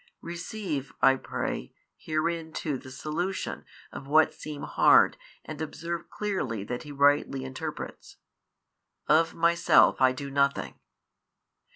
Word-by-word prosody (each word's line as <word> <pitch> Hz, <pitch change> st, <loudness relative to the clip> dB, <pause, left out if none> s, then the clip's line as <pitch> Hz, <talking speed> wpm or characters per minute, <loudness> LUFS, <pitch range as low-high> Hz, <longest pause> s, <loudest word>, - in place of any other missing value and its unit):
Receive 170 Hz, -5 st, -4 dB
(I 135 Hz, 0 st, +7 dB
pray) 60 Hz, -, -4 dB, 0.2 s
herein 160 Hz, +1 st, -2 dB
too 145 Hz, -5 st, -3 dB
the 130 Hz, -, -12 dB
solution 170 Hz, +8 st, -4 dB, 0.3 s
of 135 Hz, -, -9 dB
what 155 Hz, +2 st, +4 dB
seem 150 Hz, -2 st, -8 dB
hard -, -, +5 dB, 0.3 s
and 155 Hz, 0 st, -7 dB
observe 170 Hz, +2 st, -5 dB
clearly 160 Hz, -, -3 dB
that 120 Hz, +4 st, -4 dB
He 150 Hz, -, -9 dB
rightly 140 Hz, -1 st, +2 dB
interprets. 150 Hz, +4 st, -7 dB, 0.9 s
Of 160 Hz, +1 st, +3 dB
Myself 170 Hz, -4 st, +4 dB
I 130 Hz, 0 st, +6 dB
do 140 Hz, +2 st, -6 dB
nothing. 140 Hz, 0 st, 0 dB
150 Hz, 115 wpm, -28 LUFS, 135-165 Hz, 0.9 s, I